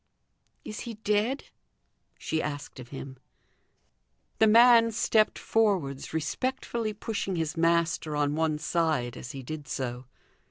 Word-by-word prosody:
"Is 215 - -6
he 235 -2 -6
dead?" 215 +5 0 0.7
she 160 - -2
asked 145 -2 -5
of 125 - -9
him. 135 0 -8 1.2
The 220 - +6
man 230 +1 +7
stepped 215 0 +2
forwards, 190 -12 0
respectfully 230 - -2
pushing 205 -2 -3
his 160 -1 -2
master 165 -2 +1
on 145 0 +1
one 160 -1 +1
side 155 -6 0
as 120 - -8
he 135 -1 -7
did 150 +2 -7
so. 125 -1 -4
165 Hz, 125 wpm, -28 LUFS, 145-215 Hz, 1.2 s, man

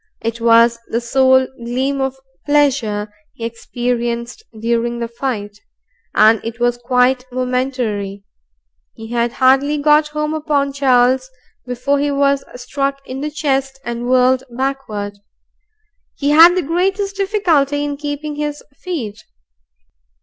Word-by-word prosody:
It 230 +1 -3
was 230 0 +5
the 230 - -1
sole 260 +2 +3 0.2
gleam 265 +4 -1
of 265 0 -1 0.3
pleasure 250 -8 +1 0.2
he 230 - -5
experienced 235 - -3 0.2
during 235 +1 0
the 235 -1 -3
fight, 225 -4 -4 0.6
and 220 0 +5
it 230 +1 -6
was 240 0 +1
quite 250 +1 +2
momentary. 250 -6 -2 0.7
He 225 0 -10
had 235 0 0
hardly 270 +3 +3
got 300 +1 +4
home 300 0 -3
upon 290 -3 0
Charles 260 -1 +3 0.4
before 250 +3 0
he 290 +1 0
was 280 -1 +1
struck 275 +2 -3
in 260 +1 -6
the 300 - -2
chest 270 -3 -1
and 240 +1 -4
whirled 255 0 +4
backward. 235 -6 -4 1.0
He 285 0 0
had 330 +4 +8
the 365 - +1
greatest 385 +5 -1
difficulty 330 -9 +1
in 290 -1 -2
keeping 290 +1 -5
his 295 0 -4 0.2
feet. 275 - -5
260 Hz, 130 wpm, -18 LUFS, 235-290 Hz, 1.0 s, had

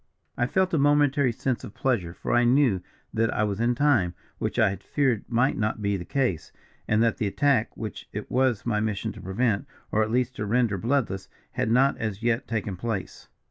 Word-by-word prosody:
"I 120 - 0
felt 185 +5 +1
a 160 - +3
momentary 145 -2 +3
sense 125 +2 -2
of 100 - -9
pleasure, 110 -11 0
for - - -3
I 120 - +4
knew 120 -6 +3 0.3
that 115 0 +1
I 105 - 0
was 105 -1 -1
in 120 +1 +2
time, 120 -11 +2 0.2
which - - -2
I - - +4
had 95 - -7
feared 130 -7 0
might 125 +3 +1
not 110 0 0
be 100 -1 0
the 90 -3 -5
case; 125 - -1 0.4
and 110 +1 +3
that 115 -2 +1
the 110 - 0
attack, 130 +1 +1
which 110 -2 -7
it 105 - -6
was 125 -4 +1
my 110 -3 +1
mission 105 -2 -2
to - - -11
prevent 105 +2 0 0.2
or 110 - +2
at 110 - +1
least 125 +2 0
to 105 - -2
render 115 -3 +1
bloodless, 115 -4 -1 0.2
had - - -1
not 130 +4 +3
as 110 -1 -3
yet 120 +1 +1
taken 105 -4 -2
place. 105 -2 -4
115 Hz, 210 wpm, -26 LUFS, 105-130 Hz, 0.4 s, I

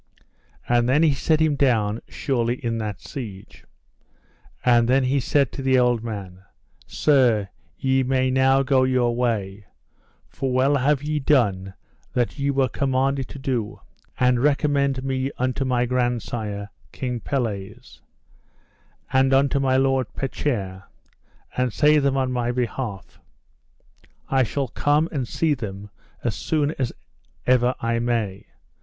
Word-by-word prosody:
And 120 0 +2
then 150 +5 +4
he 155 -3 +4
set 155 +3 +1
him 155 -2 +2
down 115 -6 +1
surely 120 -3 -1
in 115 -3 -3
that 105 -3 -4
siege. 105 -8 -9 1.0
And 120 -1 +4
then 135 +1 +4
he 135 +2 +1
said 140 0 +1
to - - -6
the 130 -1 +3
old 120 -2 +2
man: 100 -5 -7 0.5
Sir, 120 -9 +2 0.3
ye 135 0 +1
may 130 0 +1
now 135 +1 +3
go 130 -1 +3
your 125 -2 +1
way, 105 -5 -2 0.6
for 135 -1 -3
well 135 +3 +3
have 140 +1 +1
ye 150 0 -1
done 100 -10 +1 0.4
that 125 +3 -1
ye 140 0 0
were 135 -1 +2
commanded 135 0 0
to - - -10
do; 125 -5 -3 0.4
and 125 -1 +3
recommend 140 -2 +1
me 135 0 -1
unto 130 +2 -1
my 125 -1 +1
grandsire, 120 -4 -2 0.2
King 125 -2 -4
Pelles, 110 -6 -4 1.1
and 130 0 +4
unto 140 +1 +3
my 130 -1 +2
lord 135 -2 +2
Petchere, 100 -9 -3 0.7
and 125 -1 0
say 150 +5 +4
them 140 -1 +1
on 130 -1 0
my 120 -1 -1
behalf, 120 -4 -4 1.1
I 135 -1 +3
shall 135 +3 -1
come 150 +6 +1
and 135 -6 -2
see 155 +9 +1
them 105 -5 -7 0.3
as 120 - 0
soon 150 +5 0
as 130 -3 0 0.5
ever 125 0 +3
I 115 0 0
may. 115 -5 -2
130 Hz, 140 wpm, -23 LUFS, 115-135 Hz, 1.1 s, then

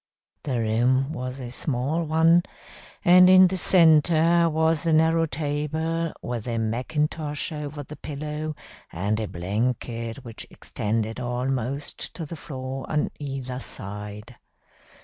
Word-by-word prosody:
The 130 -4 -2
room 125 +6 +2
was 130 -2 -5
a 120 -2 -6
small 140 +5 -1
one, 165 +2 +4 0.6
and 180 +1 +8
in 185 0 +9
the 185 +1 -2
centre 170 -1 +5
was 160 0 +1
in 160 -1 +5
the 160 - +6
narrow 165 0 +2
table, 155 +3 -2
with 120 -1 -4
a 115 -1 -1
macintosh 145 +7 -2
over 150 -1 -5
the 150 +2 -10
pillow, 150 +1 -5 0.4
and 100 +6 -1
a 110 - -2
blanket 115 +6 -3
which 115 -2 -6
extended 110 +2 -3
almost 125 +2 -2
to 165 - -5
the 165 - -7
floor 135 -3 -6
on 150 -1 0
either 135 -3 -5
side. 105 +2 -8
140 Hz, 130 wpm, -25 LUFS, 120-160 Hz, 0.6 s, in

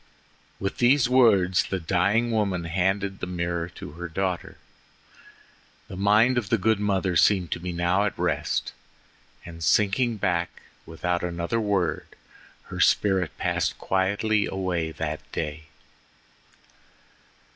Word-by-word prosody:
With 100 - -4
these 125 +1 +4
words 100 -8 +4
the 95 - -3
dying 100 +8 +1
woman 100 -5 0
handed 95 +3 -1
the - - -4
mirror 85 -1 -3
to - - -8
her 85 +3 -7
daughter. 90 +1 -3 1.3
The - - -7
mind 105 +6 +3
of 105 -5 -7
the 115 - +3
good 110 +2 +1
mother 95 -3 0
seemed 95 -3 +3
to - - -2
be 90 +1 -5
now 90 +4 +1
at 105 - -3
rest, - - -1 0.7
and 85 -1 -9
sinking 105 +6 +2
back 85 -3 -2 0.2
without 85 +2 -2
another 85 +5 -2
word 100 -5 -1 0.7
her - - -5
spirit 95 -8 +2
passed - - -1
quietly 100 +3 0
away 90 -4 -2
that 75 0 -4
day. 75 +1 -4
95 Hz, 125 wpm, -25 LUFS, 85-105 Hz, 1.3 s, these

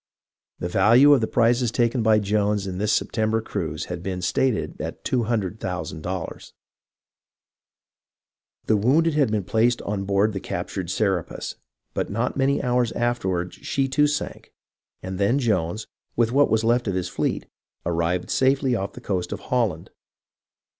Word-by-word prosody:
The - - -3
value 120 +10 +6
of 135 - +4
the 110 - +1
prizes 120 +1 +2
taken 120 0 +1
by 110 -1 +4
Jones 105 -1 +1
in 95 -1 -4
this 105 +1 +1
September 110 +2 +1
cruise 110 - -4
has 90 -1 -5
been 90 0 -4
stated 120 +1 0
at 80 +1 -6
$200,000. 95 -7 -3 2.1
The 110 - +3
wounded 150 +10 +3
had 145 -5 +3
been 105 -2 0
placed 115 +5 +2
on 100 -1 -3
board 100 +2 +2
the 95 - -3
captured 90 -1 -4
Serapis, 95 -3 -1 0.4
but - - -2
not 115 +4 -1
many 135 +1 +1
hours 125 -2 +1
afterward 95 -7 -1
she 135 -1 -1
too 145 +3 +3
sank, 150 0 -4 0.5
and 95 0 -5
then 100 +7 +3
Jones, 105 -5 0 0.3
with 115 -1 +2
what 140 +3 +4
was 110 0 +2
left 120 +1 +2
of 95 - 0
his 90 -1 -1
fleet, - - -2 0.4
arrived 85 +1 -1
safely 135 -1 +2
off 100 -3 -3
the - - -10
coast 95 -3 -2
of - - -4
Holland. 110 -10 -1
110 Hz, 150 wpm, -24 LUFS, 95-120 Hz, 2.1 s, value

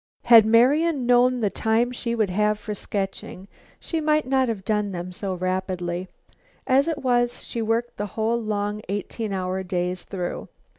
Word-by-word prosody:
Had 230 -2 +8
Marian 270 +5 +3
known 245 0 +4
the 205 -3 +1
time 225 +2 +1
she 235 -1 -3
would 215 -5 0
have 210 +2 +1
for 210 0 -5
sketching, 195 -2 -5 0.3
she 325 -2 -3
might 305 0 +2
not 265 0 +2
have 200 -4 -4
done 210 -2 0
them 175 +1 -5
so 190 0 -4
rapidly. 185 -1 -2 0.6
As 275 +2 +3
it 300 -4 -3
was, 240 -1 +1
she 235 - -5
worked 230 +2 -1
the 205 - -3
whole 230 +2 +1
long 210 -1 -2
eighteen 205 +2 -3
hour 185 0 -2
days 180 -1 -2
through. 180 -3 -5
215 Hz, 165 wpm, -24 LUFS, 190-245 Hz, 0.6 s, Had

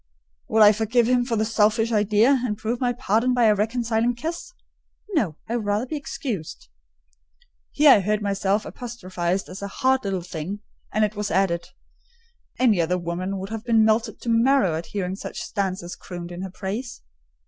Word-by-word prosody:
"Would 220 -1 +5
I 210 - +9
forgive 225 +2 +1
him 245 -1 +2
for 240 -2 -1
the 215 0 +1
selfish 225 +1 +2
idea, 215 +5 +3
and 210 -4 -2
prove 230 +3 -3
my 245 -1 +2
pardon 245 +1 +1
by 245 - +3
a 215 -2 +6
reconciling 230 +2 0
kiss?" 325 - -5 0.6
"No: 210 - +1
I 230 - -2
would 230 -3 -2
rather 205 +4 +1
be 285 - -5
excused." 255 - -5 1.0
Here 295 -1 +6
I 215 - +7
heard 210 +2 0
myself 200 0 0
apostrophised 190 -6 -3
as 185 +2 -9
a 200 - -3
"hard 260 +6 +1
little 190 -3 -2
thing;" 180 +4 -6 0.3
and 215 0 +2
it 210 0 -5
was 210 0 -2
added, 175 -2 +1 0.9
"any 225 -8 +3
other 180 +2 0
woman 180 +3 -3
would 190 +1 -6
have 225 -1 -5
been 225 -2 +4
melted 220 0 +1
to 235 - -4
marrow 230 -5 +3
at 160 +2 -4
hearing 190 -3 -3
such - - -7
stanzas 185 -4 -3
crooned 175 -1 -8
in 175 +1 -6
her 190 - -5
praise." 210 +6 -5
215 Hz, 180 wpm, -24 LUFS, 190-235 Hz, 1.0 s, I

